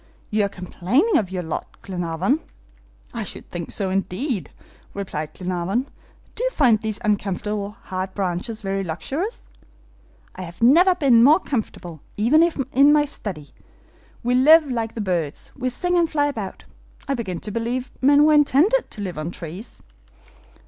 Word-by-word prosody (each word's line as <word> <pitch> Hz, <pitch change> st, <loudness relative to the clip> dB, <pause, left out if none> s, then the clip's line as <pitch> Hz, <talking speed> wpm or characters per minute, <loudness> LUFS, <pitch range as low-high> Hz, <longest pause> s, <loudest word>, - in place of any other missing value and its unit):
"You 210 Hz, -1 st, +2 dB
are -, -, -2 dB
complaining 200 Hz, -, +1 dB
of 200 Hz, -5 st, -3 dB
your 185 Hz, -1 st, -3 dB
lot, 160 Hz, -1 st, -6 dB
Glenarvan." 180 Hz, -, -1 dB, 0.7 s
"I 230 Hz, -2 st, -3 dB
should -, -, -8 dB
think 170 Hz, -2 st, -5 dB
so, 195 Hz, -3 st, -2 dB
indeed," 195 Hz, -, -2 dB, 0.5 s
replied 155 Hz, -6 st, -4 dB
Glenarvan. 185 Hz, +8 st, -2 dB, 0.4 s
"Do 485 Hz, -, -4 dB
you -, -, +2 dB
find 245 Hz, -, +3 dB
these 215 Hz, -2 st, -3 dB
uncomfortable 210 Hz, +1 st, -2 dB
hard 190 Hz, 0 st, -4 dB
branches 195 Hz, +3 st, -3 dB
very 195 Hz, 0 st, -1 dB
luxurious?" 270 Hz, -, -4 dB, 0.9 s
"I 185 Hz, -, -7 dB
have 170 Hz, -1 st, -9 dB
never 350 Hz, +9 st, +6 dB
been 265 Hz, -9 st, +5 dB
more 305 Hz, +7 st, +7 dB
comfortable, 180 Hz, -, -4 dB, 0.2 s
even 245 Hz, +10 st, +4 dB, 0.3 s
in 280 Hz, +3 st, +6 dB
my 295 Hz, 0 st, +4 dB
study. 185 Hz, -, -6 dB, 0.7 s
We 245 Hz, +1 st, +1 dB
live 295 Hz, +3 st, +6 dB
like 225 Hz, -2 st, -2 dB
the 225 Hz, -, -3 dB
birds, 170 Hz, -7 st, -2 dB
we 255 Hz, -1 st, -2 dB
sing 355 Hz, +8 st, -1 dB
and 340 Hz, -2 st, +3 dB
fly 290 Hz, -2 st, +1 dB
about. 220 Hz, -10 st, -5 dB, 0.4 s
I 275 Hz, -, 0 dB
begin 195 Hz, -9 st, -3 dB
to 210 Hz, -, -5 dB
believe 235 Hz, +3 st, -3 dB
men 285 Hz, +2 st, +6 dB
were 310 Hz, -, +5 dB
intended 305 Hz, -, +4 dB
to 210 Hz, -, -7 dB
live 180 Hz, -6 st, -4 dB
on 155 Hz, +2 st, -3 dB
trees." 175 Hz, +5 st, -8 dB
215 Hz, 155 wpm, -22 LUFS, 185-280 Hz, 0.9 s, more